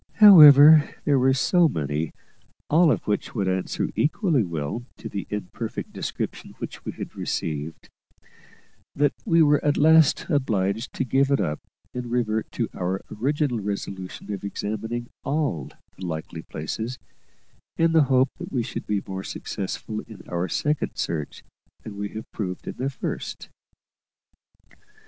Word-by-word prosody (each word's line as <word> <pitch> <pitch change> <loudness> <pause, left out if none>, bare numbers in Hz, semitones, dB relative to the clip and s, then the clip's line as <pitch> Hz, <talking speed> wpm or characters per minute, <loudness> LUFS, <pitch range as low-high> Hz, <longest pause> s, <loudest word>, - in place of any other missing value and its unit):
However, 155 -7 +9
there 140 -2 +3
were 130 +1 +3
so 170 +4 +3
many, 75 - -2 0.6
all 160 +1 +5
of - - -1
which 105 +3 -2
would 100 -4 0
answer 95 0 -1
equally 155 - +2
well 85 +5 -4
to - - -7
the 100 -3 -5
imperfect 105 -3 -5
description - - -5
which - - -7
we - - -5
had - - -8
received, 75 0 -4 1.1
that 145 0 +2
we 165 -6 +5
were 145 -1 +3
at 145 - +2
last 160 0 +5
obliged 110 - 0
to - - -1
give 135 +2 +2
it 140 - +2
up 75 0 -1 0.3
and 125 -1 -5
revert 110 -3 -1
to - - -1
our 95 +2 -3
original 140 +1 0
resolution 100 -1 -5
of 100 - -6
examining 110 +4 -4 0.2
all 140 - -1 0.3
the 95 - -11
likely 80 -1 -5
places, 110 +12 -5 0.8
in 165 0 +3
the 160 -3 +5
hope 130 0 +3
that - - -7
we 125 -3 0
should 125 - -6
be 105 -2 -1
more 95 0 -5
successful 105 +3 -5
in 110 - -12
our 90 +1 -2
second 150 0 -1
search 75 -3 -4 0.4
than 110 - -8
we 100 0 -4
had 110 +2 -7
proved 90 -4 -5
in - - -6
our 135 - 0
first. 135 - -5
115 Hz, 150 wpm, -24 LUFS, 95-145 Hz, 1.1 s, However